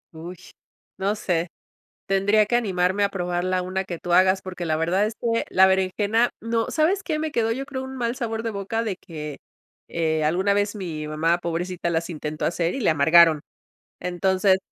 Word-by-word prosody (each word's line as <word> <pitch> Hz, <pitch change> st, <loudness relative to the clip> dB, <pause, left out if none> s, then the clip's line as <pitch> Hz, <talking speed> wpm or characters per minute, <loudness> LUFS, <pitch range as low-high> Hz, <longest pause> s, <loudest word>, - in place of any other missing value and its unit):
Ush, 170 Hz, +2 st, -10 dB, 0.5 s
no 200 Hz, +2 st, 0 dB
sé, 175 Hz, -5 st, -1 dB, 0.6 s
tendría 205 Hz, +2 st, +3 dB
que 240 Hz, -, 0 dB
animarme 190 Hz, -3 st, +1 dB
a 200 Hz, -, +2 dB
probarla 180 Hz, -1 st, -1 dB
una 185 Hz, +1 st, -2 dB
que 175 Hz, -3 st, -6 dB
tú 175 Hz, -, -2 dB
hagas, 185 Hz, +1 st, +4 dB
porque 185 Hz, -1 st, -6 dB
la 155 Hz, -1 st, 0 dB
verdad 175 Hz, +5 st, +1 dB
es 215 Hz, -, -3 dB
que 230 Hz, -1 st, 0 dB
la 190 Hz, +1 st, +6 dB
berenjena 200 Hz, +5 st, +2 dB
no 230 Hz, 0 st, -1 dB
¿sabes 360 Hz, +6 st, +1 dB
qué? 315 Hz, -4 st, -2 dB
Me 310 Hz, 0 st, -2 dB
quedó, 225 Hz, -3 st, +1 dB
yo 265 Hz, +4 st, -3 dB
creo, 265 Hz, -1 st, -5 dB
un 265 Hz, 0 st, -7 dB
mal 235 Hz, -1 st, -1 dB
sabor 225 Hz, -3 st, -3 dB
de 230 Hz, -, -2 dB
boca 200 Hz, +2 st, -2 dB
de 215 Hz, -4 st, -2 dB
que, 150 Hz, -5 st, -8 dB, 0.5 s
eh, 160 Hz, -2 st, 0 dB
alguna 185 Hz, +6 st, +2 dB
vez 205 Hz, 0 st, 0 dB
mi 170 Hz, -7 st, -5 dB
mamá, 160 Hz, +3 st, +1 dB
pobrecita, 175 Hz, +1 st, -3 dB
las 165 Hz, 0 st, -1 dB
intentó 155 Hz, -2 st, -4 dB
hacer, 170 Hz, +1 st, 0 dB
y -, -, -3 dB
le 230 Hz, -, +2 dB
amargaron, 160 Hz, +1 st, +5 dB, 0.6 s
entonces 185 Hz, +2 st, +2 dB
190 Hz, 190 wpm, -24 LUFS, 170-220 Hz, 0.6 s, la